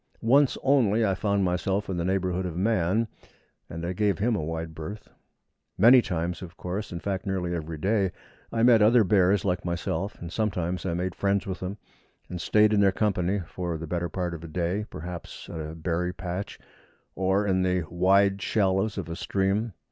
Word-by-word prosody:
Once 135 +4 +4
only 115 -5 +3
I 100 - +2
found 100 +1 0
myself 95 +3 0
in 95 - -3
the 85 - -1
neighbourhood 95 0 0
of 85 -1 -6
man, 105 +2 +1 0.6
and 85 +1 -5
I 90 - -2
gave 100 -1 +1
him 110 +4 +1
a 80 - -2
wide 80 0 -4
berth. 95 +7 -8 0.7
Many 120 +5 +8
times, 85 -3 -3
of 90 -2 -10
course 95 +4 -4
in 85 - -4
fact, 95 +1 -3
nearly 90 -2 -1
every 80 -1 -4
day 95 +2 +1 0.4
I 115 - 0
met 120 -2 +6
other 115 +2 +6
bears 100 -1 +3
like 90 -1 0
myself, 90 +3 -3
and 85 0 -7
sometimes 90 -4 -1
I 85 - -1
made 90 +1 -2
friends 100 +1 0
with 95 -2 -4
them, 95 +3 -5 0.5
and 90 -1 -5
stayed 105 0 +4
in 105 - +3
their 100 -1 +5
company 100 -1 0
for 85 -2 -4
the 80 - -6
better 85 +1 -2
part 90 0 -3
of 85 -1 -8
a - - -7
day, 90 +6 -2
perhaps 85 0 -8
at 80 - -5
a 80 +1 -6
berry 85 +2 -2
patch 90 +1 -5 0.6
or 95 +2 +1
in 95 -2 +2
the 90 -1 +1
wide 95 +3 +3
shallows 100 0 +1
of 95 -5 -4
a 85 - -5
stream. 100 +5 -1
95 Hz, 195 wpm, -27 LUFS, 85-100 Hz, 0.7 s, Many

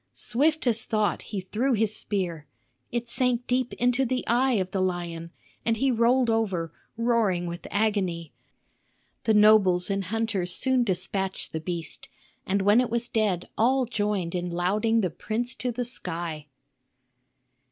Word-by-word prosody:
Swift 280 - +1
as 230 -2 +2
thought 215 -2 0
he 205 - -5
threw 220 +8 -1
his 220 -1 +1
spear; 175 -9 -3 0.4
it 240 0 -2
sank 245 0 0
deep 250 0 0
into 245 +2 +2
the 255 0 -1
eye 255 +3 +2
of 190 -4 -1
the 190 - -1
lion, 175 -2 -3 0.3
and 230 -1 +1
he 270 +3 +2
rolled 240 +2 +3
over, 195 -8 0 0.2
roaring 230 -7 +1
with 170 0 -6
agony. 190 -7 -1 0.9
The 220 - +3
nobles 205 -4 +5
and 195 -1 -1
hunters 205 -3 -1
soon 260 -2 +2
despatched 190 -1 -2
the 160 - -3
beast; 165 -2 -5 0.4
and 195 +1 +1
when 205 +5 +5
it 250 - -2
was 235 +1 -1
dead 205 -6 0
all 255 +3 +3
joined 205 -6 -1
in 180 -1 -2
lauding 210 +6 +1
the 185 -4 -1
prince 230 +8 -3
to 250 - -2
the 245 +1 -3
sky. 170 -9 -4
210 Hz, 150 wpm, -26 LUFS, 180-235 Hz, 0.9 s, nobles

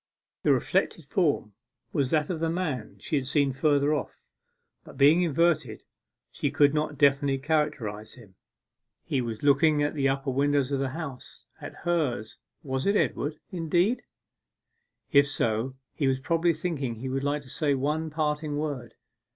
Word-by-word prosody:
The - - +3
reflected - - +1
form - - 0 0.4
was 135 -3 +1
that 155 +2 +1
of 165 - -3
the 165 0 0
man 150 - -3
she 145 +9 -2
had 130 -2 -2
seen 140 -1 +2
further 145 +1 +2
off, 150 - -4 0.6
but - - -14
being 145 +6 +6
inverted, 155 -7 +1 0.5
she - - -1
could 145 0 +4
not 150 -1 -1
definitely 140 -1 +3
characterize 135 -8 -2
him. 110 -6 -16 0.7
He 135 - -1
was 115 -1 -5
looking 145 +1 +4
at 145 - 0
the 140 -3 +1
upper 135 0 -1
windows 140 0 +1
of 140 - 0
the 135 -1 -1
House 140 -7 -8 0.2
at - - -10
hers 150 -11 -1 0.2
was 130 +1 -2
it 200 - +3
Edward, 150 -6 0
indeed? 175 +6 +1 1.1
If 140 -2 +6
so, 120 -1 -1 0.2
he 140 - 0
was 130 0 +1
probably 165 +4 +1
thinking 150 -7 -3
he 120 +4 -6
would 135 +1 -2
like 145 +1 -1
to 130 - -15
say 145 -4 +1
one 150 +4 -1
parting 150 -1 -1
word. 145 -6 -4
145 Hz, 160 wpm, -27 LUFS, 135-155 Hz, 1.1 s, being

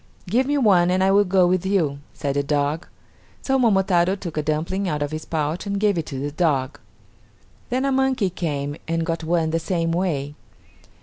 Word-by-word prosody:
"Give 245 +8 +1
me 290 +1 +1
one 190 -9 +4
and 185 +1 +2
I 190 - +4
will 200 +1 +5
go 185 -1 +3
with 180 0 +1
you," 170 -8 0
said 140 -1 -3
the 145 - +2
dog. 145 +2 -1 0.6
So 270 0 +1
Momotaro 190 -5 +3
took 180 -5 -7
a 155 - 0
dumpling 165 +6 -1
out 150 -2 -1
of 145 - -4
his 155 0 -5
pouch 160 +4 -2
and 200 0 -1
gave 205 -1 +2
it 165 -3 -3
to 135 - -5
the 145 +2 -3
dog. 145 -5 0 0.9
Then 255 +2 0
a 275 - +1
monkey 260 -7 +1
came 145 -4 -3
and 165 0 -1
got 165 -1 -2
one 160 -1 +1
the 165 - +1
same 165 -1 -1
way. 160 -5 -1
170 Hz, 200 wpm, -22 LUFS, 155-195 Hz, 0.9 s, will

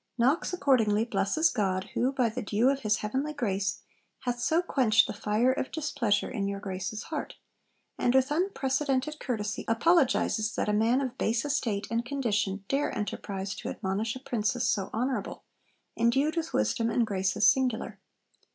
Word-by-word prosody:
Knox 265 +8 +2
accordingly 230 - +2
blesses 230 +10 +1
'God, 190 -3 -1
who 255 +2 +1
by 255 -3 +1
the 230 +3 -4
dew 220 +4 +2
of 275 - -2
his 215 -3 +1
heavenly 265 +8 -2
grace, 200 -8 -2 0.4
hath 245 -1 -2
so 320 +8 +2
quenched 250 -10 +3
the - - -5
fire 215 +4 +1
of 265 - -3
displeasure 275 -10 0
in 200 -6 -2
your 200 0 -3
Grace's 195 +2 -4
heart,' 310 -2 -5 0.6
and 245 - +2
with 265 +2 +3
unprecedented 295 -4 0
courtesy 215 -5 -3
apologises 235 -4 +2
'that - - -1
a - - +2
man 230 +5 +3
of 260 -1 -4
base 230 +4 0
estate 225 -8 -1
and 230 +1 0
condition 210 -7 -1
dare 275 +2 0
enterprise 195 -1 -4
to - - -6
admonish 205 +4 -2
a - - -6
Princess 240 -2 -1
so 195 -2 0
honourable, 240 -2 -2 0.5
endued 270 +7 +2
with 330 -1 -2
wisdom 230 -3 +1
and 235 0 +2
graces 195 -1 +1
singular.' 250 +1 +1
235 Hz, 160 wpm, -28 LUFS, 210-270 Hz, 0.6 s, quenched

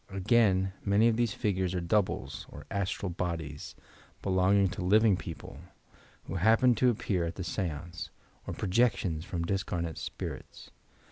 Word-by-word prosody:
Again, 95 -1 +2
many 100 +3 +4
of 115 - +1
these 115 -3 0
figures 95 -3 0
are - - +1
"doubles" 85 -6 -1
or 75 0 -10
"astral 100 -1 -2
bodies" 85 -4 -4 0.5
belonging 95 +1 +3
to 95 +2 -6
living 105 +3 +5
peo 85 -2 -6
ple, - - -11 0.7
who - - -4
happen 115 +6 +5
to 125 +2 +3
appear 100 -6 0
at 85 - -3
the 90 - -4
seance, 85 -2 -4 0.4
or - - -4
projections 95 -6 +1
from 85 -2 -3
discarnate 85 -3 -2
spirits. - - -7
95 Hz, 145 wpm, -30 LUFS, 85-105 Hz, 0.7 s, living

